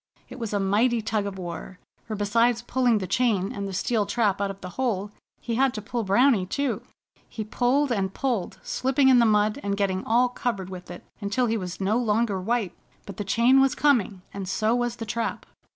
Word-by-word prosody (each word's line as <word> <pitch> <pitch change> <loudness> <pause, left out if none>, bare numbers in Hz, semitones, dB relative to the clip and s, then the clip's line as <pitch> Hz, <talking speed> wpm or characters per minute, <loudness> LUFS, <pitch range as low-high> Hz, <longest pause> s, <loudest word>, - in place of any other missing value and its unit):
It - - -9
was 230 -3 -4
a 205 - 0
mighty 220 +5 +2
tug 215 -2 -1
of 195 -1 -6
war, 180 0 -7 0.3
for 215 - -4
besides 230 +3 +2
pulling 245 -2 +2
the 195 - -3
chain 205 -2 +1
and 200 -2 -4
steel 215 +1 0
trap 205 -2 +1
out 200 - 0
of 195 0 -7
the 180 - -6
hole 205 -5 -1 0.3
he 235 - -4
had 260 +1 +2
to 215 - -4
pull 235 +1 -3
Browny, 220 +2 +4
too. 245 -2 -1 0.5
He 220 - -5
pulled 255 +6 +1
and 195 -4 0
pulled, 240 -5 -2
slipping 265 +1 +2
in 255 -2 +6
the 235 - +5
mud, 210 +3 +2
and 200 0 -2
getting 190 -2 0
all 245 +3 +3
covered 205 -7 -3
with 180 -2 -9
it 175 - -9 0.2
until 210 +4 0
he 225 -1 0
was 180 -4 -5
no 205 +4 +1
longer 215 -4 +1
white. 220 -2 -1 0.3
But 200 - -9
the 205 - -2
chain 235 +7 +4
was 270 -1 +3
coming, 225 -10 +2
and 195 -2 -5
so 215 +4 +1
was 240 -1 0
the 230 - -6
trap. 230 +2 -3
215 Hz, 210 wpm, -25 LUFS, 195-240 Hz, 0.5 s, in